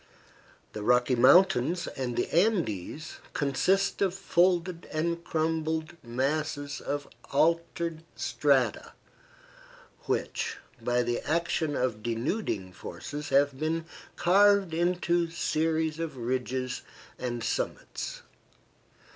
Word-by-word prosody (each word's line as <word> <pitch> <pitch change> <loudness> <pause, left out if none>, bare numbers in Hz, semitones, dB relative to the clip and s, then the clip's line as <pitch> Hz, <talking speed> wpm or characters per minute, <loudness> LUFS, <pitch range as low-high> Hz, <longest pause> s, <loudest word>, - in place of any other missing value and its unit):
The 105 - -5
Rocky 125 +4 +3
Mountains 170 +4 +5
and 125 -3 -4
the - - +1
Andes 160 - 0
consist 185 +10 +1
of 190 -2 +2
folded 175 -1 +1
and 170 +2 -1
crumpled 160 0 -1
masses 145 +3 -2
of 145 0 -3 0.2
altered 165 +2 +1
strata - - +1 1.1
which, - - -1 0.2
by 120 0 +1
the 120 0 -1
action 160 -2 0
of 125 -5 -1
denuding 115 - -2
forces, 145 +9 -7
have 140 0 +3
been 160 +1 -1 0.3
carved 200 0 +4
into 175 0 +1
series 160 -1 0
of 165 -5 -4
ridges 125 +1 -2 0.4
and 120 -2 -3
summits. 115 - -3
155 Hz, 95 wpm, -29 LUFS, 130-170 Hz, 1.1 s, Mountains